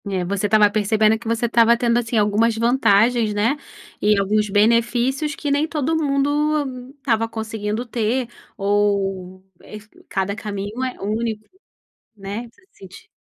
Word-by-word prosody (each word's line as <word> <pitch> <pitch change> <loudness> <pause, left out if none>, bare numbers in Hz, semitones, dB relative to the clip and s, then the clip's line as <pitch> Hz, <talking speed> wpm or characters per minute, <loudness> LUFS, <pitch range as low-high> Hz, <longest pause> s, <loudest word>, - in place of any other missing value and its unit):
É, 185 -2 -2
você 200 +2 -1
estava 210 0 +5
percebendo 215 +1 +2
que 235 - -10
você 230 +1 0
estava 235 0 +4
tendo, 235 0 +2
assim, 230 -1 -2
algumas 215 +2 +2
vantagens, 230 -2 +2
né, 225 +7 +1 0.5
e 210 0 +3
alguns 210 +2 +1
benefícios 235 +7 +1
que 290 - -3
nem 290 +2 +1
todo 315 0 -1
mundo 285 -3 -1
estava 230 -5 0
conseguindo 220 0 -4
ter 235 +1 -1 0.3
ou, 195 -2 -1 0.2
eh, 215 - -10 0.3
cada 195 +1 -2
caminho 210 +3 -5
é 255 -1 -4
único, 215 +1 -3 0.7
né, 205 +4 -6
você - - -27
sent 190 -1 -14
225 Hz, 140 wpm, -21 LUFS, 205-245 Hz, 0.7 s, estava